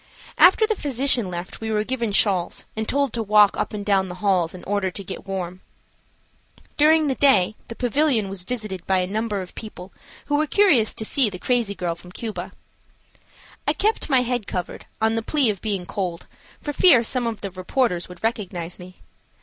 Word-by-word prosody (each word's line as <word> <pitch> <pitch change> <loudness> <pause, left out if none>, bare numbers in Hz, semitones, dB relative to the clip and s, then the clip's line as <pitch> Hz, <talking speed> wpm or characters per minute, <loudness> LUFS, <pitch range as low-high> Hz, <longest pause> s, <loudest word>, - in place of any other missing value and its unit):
After 410 +4 +7
the 440 - 0
physician 265 - +2
left 175 +3 -7
we 220 - -3
were 215 -1 +1
given 235 -2 -2
shawls 195 -3 +1
and 220 0 -3
told 280 -3 0
to 230 - -1
walk 210 -1 +5
up - - -2
and 205 -1 -5
down 195 -2 +2
the 180 - -7
halls 185 -4 +1
in 180 - -11
order 200 -1 -1
to 195 +2 -6
get 190 +1 -8
warm. 185 -1 -5 1.1
During 310 +1 +4
the 275 - +1
day 255 -8 +3
the 230 - -8
pavilion 250 -3 +1
was 195 -1 -3
visited 210 -4 -5
by 190 - +3
a 180 - +1
number 210 0 -2
of 180 - -13
people 195 -4 -10 0.3
who 290 - +1
were 305 +1 +1
curious 290 - +3
to 220 - -2
see 255 0 +3
the 190 - -7
crazy 230 0 0
girl 175 -1 -2
from 180 +1 -14
Cuba. 220 +2 -6 1.2
I - - +3
kept 430 -3 0
my 260 -3 +4
head 245 -3 -2
covered, 180 -2 -5
on 220 0 +2
the 225 - 0
plea 265 -1 +1
of 200 - -8
being 200 -5 -2
cold, 180 -3 -4 0.4
for 295 - -3
fear 280 -6 +6
some 245 +1 0
of 225 -2 -4
the 200 - -5
reporters 185 0 -1
would 180 +2 -13
recognize 185 -7 -3
me. 180 0 -13
215 Hz, 200 wpm, -23 LUFS, 185-250 Hz, 1.2 s, After